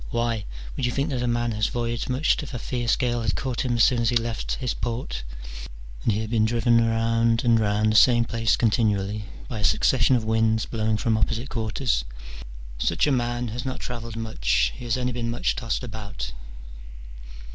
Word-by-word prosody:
"Why! 115 Hz, -3 st, -1 dB, 0.3 s
would 125 Hz, -, 0 dB
you -, -, -1 dB
think 140 Hz, +4 st, -1 dB
that 130 Hz, -3 st, -1 dB
a 125 Hz, -, 0 dB
man 120 Hz, 0 st, 0 dB
had 105 Hz, -1 st, 0 dB
voyaged 120 Hz, 0 st, -2 dB
much 130 Hz, +7 st, +2 dB
if 140 Hz, -3 st, -7 dB
a -, -, -1 dB
fierce 120 Hz, 0 st, 0 dB
gale 120 Hz, -1 st, 0 dB
had 110 Hz, -2 st, 0 dB
caught 130 Hz, -3 st, -2 dB
him 125 Hz, -2 st, 0 dB
as 115 Hz, -, +4 dB
soon 125 Hz, -, +4 dB
as 115 Hz, -, +2 dB
he 120 Hz, -, 0 dB
left 115 Hz, -1 st, -3 dB
his 125 Hz, -3 st, -2 dB
port, 120 Hz, +1 st, -3 dB, 0.8 s
and -, -, +2 dB
he 105 Hz, +1 st, 0 dB
had 110 Hz, 0 st, -5 dB
been 110 Hz, -2 st, +3 dB
driven 115 Hz, +1 st, +3 dB
round 115 Hz, 0 st, +2 dB
and 115 Hz, -2 st, +4 dB
round 105 Hz, 0 st, +2 dB
the -, -, -1 dB
same 120 Hz, +1 st, +6 dB
place 115 Hz, -1 st, +1 dB
continually 105 Hz, -3 st, +1 dB, 0.2 s
by 115 Hz, -, -5 dB
a -, -, -4 dB
succession 130 Hz, +4 st, +3 dB
of 120 Hz, -, 0 dB
winds 110 Hz, 0 st, +2 dB
blowing 110 Hz, -1 st, -1 dB
from 110 Hz, 0 st, +1 dB
opposite 115 Hz, +5 st, -1 dB
quarters? 115 Hz, -, -1 dB, 0.8 s
such 85 Hz, +7 st, +2 dB
a 150 Hz, -, +2 dB
man 120 Hz, -1 st, 0 dB
has 120 Hz, +3 st, -4 dB
not 130 Hz, -1 st, -4 dB
travelled 115 Hz, -2 st, -6 dB
much, 65 Hz, -, 0 dB
he 125 Hz, -, -9 dB
has 120 Hz, +1 st, 0 dB
only 125 Hz, 0 st, -1 dB
been 120 Hz, -1 st, -2 dB
much 120 Hz, +1 st, 0 dB
tossed 115 Hz, 0 st, -2 dB
about. 105 Hz, -, -6 dB
115 Hz, 200 wpm, -25 LUFS, 110-120 Hz, 0.8 s, same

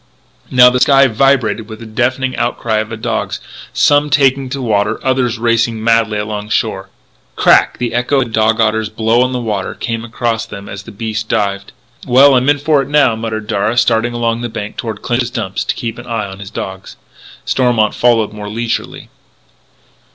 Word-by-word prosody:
Now 125 Hz, -1 st, +6 dB
the 125 Hz, -, 0 dB
sky 135 Hz, +1 st, +5 dB
vibrated 120 Hz, -3 st, +1 dB
with 110 Hz, -, -8 dB
the 115 Hz, -, -9 dB
deafening 130 Hz, +4 st, -1 dB
outcry 120 Hz, -2 st, -1 dB
of 110 Hz, 0 st, -2 dB
the 110 Hz, -, -6 dB
dogs, 110 Hz, -, -3 dB, 0.3 s
some 145 Hz, 0 st, +3 dB
taking 135 Hz, -2 st, +2 dB
to 140 Hz, -, -4 dB
water, 110 Hz, -3 st, 0 dB
others 130 Hz, -3 st, +1 dB
racing 115 Hz, -1 st, 0 dB
madly 115 Hz, -2 st, +2 dB
along 105 Hz, 0 st, -4 dB
shore. 95 Hz, -3 st, -1 dB, 0.5 s
Crack! -, -, +4 dB
The 120 Hz, -1 st, -3 dB
echo 120 Hz, +4 st, +1 dB
of 135 Hz, -, +3 dB
the 115 Hz, -, -9 dB
dog 110 Hz, 0 st, +2 dB
otter's 110 Hz, -1 st, +1 dB
blow 115 Hz, +5 st, +1 dB
on 130 Hz, 0 st, +1 dB
the 125 Hz, -, -2 dB
water 105 Hz, -5 st, -3 dB
came 115 Hz, -1 st, -4 dB
across 115 Hz, -1 st, -2 dB
to 110 Hz, -, -9 dB
them 100 Hz, 0 st, -10 dB
as 100 Hz, -1 st, -7 dB
the 115 Hz, -, -12 dB
beast 110 Hz, 0 st, -4 dB
dived. 100 Hz, -3 st, -1 dB, 0.4 s
"Well, 135 Hz, +3 st, +6 dB
I'm 130 Hz, +2 st, +3 dB
in 145 Hz, -, +4 dB
for 145 Hz, 0 st, +2 dB
it 135 Hz, -, -5 dB
now," 140 Hz, -5 st, +3 dB
muttered 110 Hz, -1 st, -4 dB
Darragh, 105 Hz, +3 st, -1 dB
starting 120 Hz, 0 st, +2 dB
along 115 Hz, -1 st, -1 dB
the 120 Hz, -, -3 dB
bank 105 Hz, -2 st, -6 dB
toward 110 Hz, -3 st, -6 dB
Clinch's 120 Hz, 0 st, 0 dB
Dump, 110 Hz, -6 st, -5 dB
to -, -, -1 dB
keep 115 Hz, -2 st, -5 dB
an 120 Hz, -, -11 dB
eye 115 Hz, -3 st, -2 dB
on 95 Hz, 0 st, -9 dB
his 100 Hz, -1 st, -8 dB
dogs. 95 Hz, -2 st, -7 dB, 0.5 s
Stormont 120 Hz, -5 st, +1 dB
followed 115 Hz, -3 st, +2 dB
more 105 Hz, -1 st, -7 dB
leisurely. 115 Hz, +2 st, -4 dB
115 Hz, 195 wpm, -15 LUFS, 110-125 Hz, 0.5 s, Now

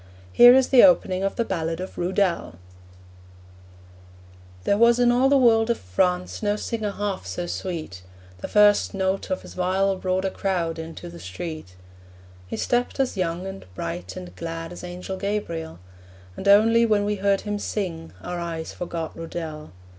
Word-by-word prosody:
Here 245 Hz, +1 st, +9 dB
is 265 Hz, -1 st, +3 dB
the 255 Hz, -3 st, +7 dB
opening 190 Hz, -9 st, +4 dB
of 195 Hz, -, -1 dB
the 235 Hz, -, 0 dB
ballad 165 Hz, -3 st, -2 dB
of 185 Hz, -, -6 dB
Rudel: 180 Hz, -, 0 dB, 2.1 s
There 200 Hz, -, +2 dB
was 235 Hz, +1 st, +6 dB
in 245 Hz, -1 st, +4 dB
all 255 Hz, +2 st, +3 dB
the 280 Hz, -, +5 dB
world 230 Hz, -3 st, +4 dB
of 235 Hz, -, +1 dB
France 180 Hz, -, -1 dB
No 205 Hz, -1 st, +1 dB
singer 215 Hz, 0 st, -3 dB
half 200 Hz, -1 st, -4 dB
so 175 Hz, -, -4 dB
sweet: 165 Hz, -, -5 dB, 0.4 s
The -, -, -5 dB
first 205 Hz, -1 st, +4 dB
note 190 Hz, 0 st, -1 dB
of 185 Hz, -, -2 dB
his -, -, -11 dB
viol 190 Hz, +2 st, +1 dB
brought 185 Hz, 0 st, -1 dB
A 190 Hz, -, 0 dB
crowd 170 Hz, -5 st, -2 dB
into 160 Hz, -, -8 dB
the 85 Hz, 0 st, -10 dB
street. 95 Hz, -, -7 dB, 0.7 s
He -, -, -5 dB
stepped 245 Hz, +2 st, -1 dB
as 265 Hz, -3 st, 0 dB
young, 180 Hz, -1 st, -2 dB
and 195 Hz, 0 st, -7 dB
bright, 90 Hz, +1 st, -5 dB
and 90 Hz, 0 st, -9 dB
glad 165 Hz, -, -6 dB
As 175 Hz, -, -9 dB
Angel 180 Hz, +2 st, -6 dB
Gabriel. 180 Hz, -, -3 dB, 0.6 s
And 200 Hz, -, -5 dB
only 225 Hz, +3 st, +6 dB
when 210 Hz, -3 st, +2 dB
we 210 Hz, 0 st, -1 dB
heard 200 Hz, 0 st, +1 dB
him 205 Hz, -1 st, -3 dB
sing 170 Hz, -7 st, -4 dB
Our 175 Hz, 0 st, -4 dB
eyes 165 Hz, -1 st, -5 dB
forgot 170 Hz, -2 st, -5 dB
Rudel. 160 Hz, -2 st, -6 dB
185 Hz, 170 wpm, -24 LUFS, 165-210 Hz, 2.1 s, Here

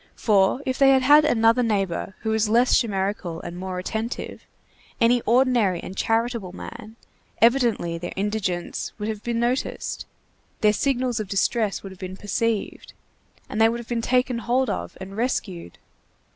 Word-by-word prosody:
For 205 Hz, +4 st, +2 dB
if 260 Hz, -1 st, -2 dB
they 275 Hz, -1 st, +6 dB
had 265 Hz, -1 st, +4 dB
had 295 Hz, +3 st, +7 dB
another 230 Hz, -2 st, +3 dB
neighbor 195 Hz, -5 st, -1 dB
who 220 Hz, -, -1 dB
was 220 Hz, -1 st, +1 dB
less 240 Hz, +3 st, +4 dB
chimerical 195 Hz, -6 st, -2 dB
and 170 Hz, -, -7 dB
more 185 Hz, 0 st, -5 dB
attentive, 220 Hz, +6 st, -5 dB, 0.5 s
any 240 Hz, +1 st, +4 dB
ordinary 235 Hz, -6 st, +3 dB
and 185 Hz, -, -8 dB
charitable 225 Hz, -4 st, -1 dB
man, 225 Hz, +2 st, -9 dB, 0.4 s
evidently 230 Hz, -8 st, +2 dB
their 175 Hz, -, -5 dB
indigence 195 Hz, -3 st, -2 dB
would 210 Hz, -1 st, -4 dB
have 215 Hz, -2 st, -4 dB
been 235 Hz, 0 st, -2 dB
noticed, 245 Hz, +2 st, -2 dB, 0.5 s
their 210 Hz, -1 st, +4 dB
signals 250 Hz, 0 st, 0 dB
of 215 Hz, -, -4 dB
distress 205 Hz, +1 st, 0 dB
would 195 Hz, -, -8 dB
have 190 Hz, -, -13 dB
been 185 Hz, 0 st, -7 dB
perceived, 215 Hz, +2 st, -2 dB, 0.5 s
and 215 Hz, -, -2 dB
they 225 Hz, -, +6 dB
would 235 Hz, +1 st, -3 dB
have 235 Hz, -, -9 dB
been 235 Hz, -1 st, -1 dB
taken 250 Hz, 0 st, +1 dB
hold 245 Hz, 0 st, +1 dB
of -, -, -5 dB
and 195 Hz, +1 st, -8 dB
rescued! 195 Hz, -, -3 dB
225 Hz, 160 wpm, -24 LUFS, 195-240 Hz, 0.5 s, had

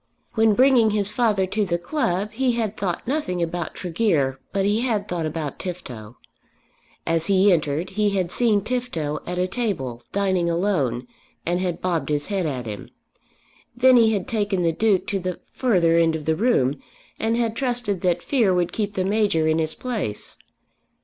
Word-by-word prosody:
When 220 Hz, -2 st, +3 dB
bringing 255 Hz, -3 st, +5 dB
his 205 Hz, -1 st, 0 dB
father 215 Hz, -6 st, +2 dB
to 210 Hz, +3 st, -1 dB
the 170 Hz, -3 st, 0 dB
club 210 Hz, -, -1 dB
he 250 Hz, +2 st, +1 dB
had 220 Hz, -3 st, -1 dB
thought 190 Hz, -2 st, -3 dB
nothing 265 Hz, -, -1 dB
about 170 Hz, -1 st, -4 dB
Tregear 160 Hz, -8 st, 0 dB
but 195 Hz, -1 st, 0 dB
he 210 Hz, +3 st, +2 dB
had 220 Hz, -5 st, -1 dB
thought 170 Hz, -3 st, -2 dB
about 155 Hz, -2 st, -4 dB
Tifto. 125 Hz, -, -7 dB, 0.9 s
As 165 Hz, 0 st, 0 dB
he 195 Hz, 0 st, +5 dB
entered 155 Hz, +2 st, -1 dB
he 210 Hz, +1 st, +1 dB
had 185 Hz, -3 st, -1 dB
seen 220 Hz, -3 st, +2 dB
Tifto 210 Hz, -12 st, -2 dB
at 180 Hz, 0 st, -3 dB
a 180 Hz, -, +2 dB
table 175 Hz, -, -3 dB
dining 190 Hz, -3 st, +1 dB
alone, 165 Hz, -, 0 dB, 0.4 s
and 175 Hz, +1 st, 0 dB
had 180 Hz, -2 st, -2 dB
bobbed 175 Hz, -4 st, -1 dB
his 145 Hz, -1 st, 0 dB
head 185 Hz, -4 st, 0 dB
at 130 Hz, -4 st, -3 dB
him. 105 Hz, -3 st, -7 dB, 0.9 s
Then 255 Hz, +1 st, +6 dB
he 225 Hz, -2 st, +5 dB
had 200 Hz, -4 st, -1 dB
taken 205 Hz, -4 st, 0 dB
the 165 Hz, -, +3 dB
Duke 200 Hz, +2 st, +2 dB
to 200 Hz, -, -1 dB
the 185 Hz, -1 st, -4 dB
further 175 Hz, -10 st, +3 dB
end 165 Hz, -1 st, +3 dB
of 155 Hz, -2 st, -5 dB
the 160 Hz, -, +2 dB
room, 155 Hz, -, +1 dB, 0.4 s
and 225 Hz, +1 st, +1 dB
had 230 Hz, -2 st, 0 dB
trusted 240 Hz, -7 st, -1 dB
that 175 Hz, -2 st, +1 dB
fear 225 Hz, -10 st, +2 dB
would 175 Hz, -1 st, 0 dB
keep 205 Hz, -2 st, -2 dB
the 185 Hz, -, 0 dB
Major 200 Hz, -6 st, +2 dB
in 160 Hz, +1 st, +2 dB
his 160 Hz, -1 st, -1 dB
place. 220 Hz, -, -4 dB
190 Hz, 180 wpm, -23 LUFS, 165-220 Hz, 0.9 s, Then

